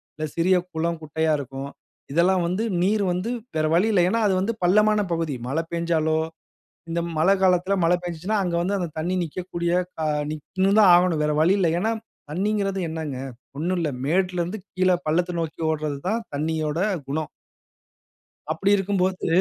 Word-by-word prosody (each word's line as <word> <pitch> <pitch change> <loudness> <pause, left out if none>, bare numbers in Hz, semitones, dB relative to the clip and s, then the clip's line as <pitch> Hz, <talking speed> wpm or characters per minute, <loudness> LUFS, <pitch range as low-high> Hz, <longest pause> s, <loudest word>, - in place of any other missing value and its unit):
இல்ல 155 0 -3
சிறிய 185 +2 +4 0.2
குளம், 165 0 -1
குட்டையா 160 +1 0
இருக்கும். 135 0 -6 0.4
இதெல்லாம் 175 +2 +3
வந்து 185 +6 -1 0.2
நீர் 205 +2 +2
வந்து 185 +7 -2 0.3
வேற 155 - +2
வழியில்ல. 200 +1 +3
ஏன்னா 230 - +1
அது 195 - +2
வந்து 215 +3 -1
பள்ளமான 210 +3 +4
பகுதி 165 -4 -1
மழை 160 +4 0
பேஞ்சாலோ, 160 -2 +1 0.7
இந்த 170 +1 0 0.2
மழை 190 +5 +5
காலத்தில, 185 +1 +3
மழை 175 +2 +4
பேஞ்சுச்சுன்னா, 175 +5 -2
அங்க 175 -2 -2
வந்து 200 +3 0
அந்த 175 -2 -2
தண்ணி 175 +4 -1
நிக்கக்கூடிய, 170 +1 -3 0.3
அ - - +1 0.3
நிக் 155 -2 -7 0.2
ன்னு 195 +2 +4
தான் 195 - +7
ஆகணும். 175 -3 +2
வேற 150 - +1
வழி 185 +5 +4
இல்ல. 170 -3 +3
ஏன்னா 220 +3 +1 0.4
தண்ணீங்கறது 195 +1 0
என்னங்க? 160 -5 -4 0.4
ஒண்ணு 175 +5 0
இல்ல. 165 -3 0 0.2
மேட்டுலேருந்து 180 +4 0
கீழே 185 0 +3
பள்ளத்த 175 +3 +1
நோக்கி 165 0 -5
ஓடுறது 155 -2 -2
தான் 225 +3 0
தண்ணியோட 155 +1 -1 0.3
குணம். 150 +2 -2 1.2
அப்படி 195 +1 +1
இருக்கும்போது 190 -1 0
175 Hz, 160 wpm, -24 LUFS, 160-190 Hz, 1.2 s, தான்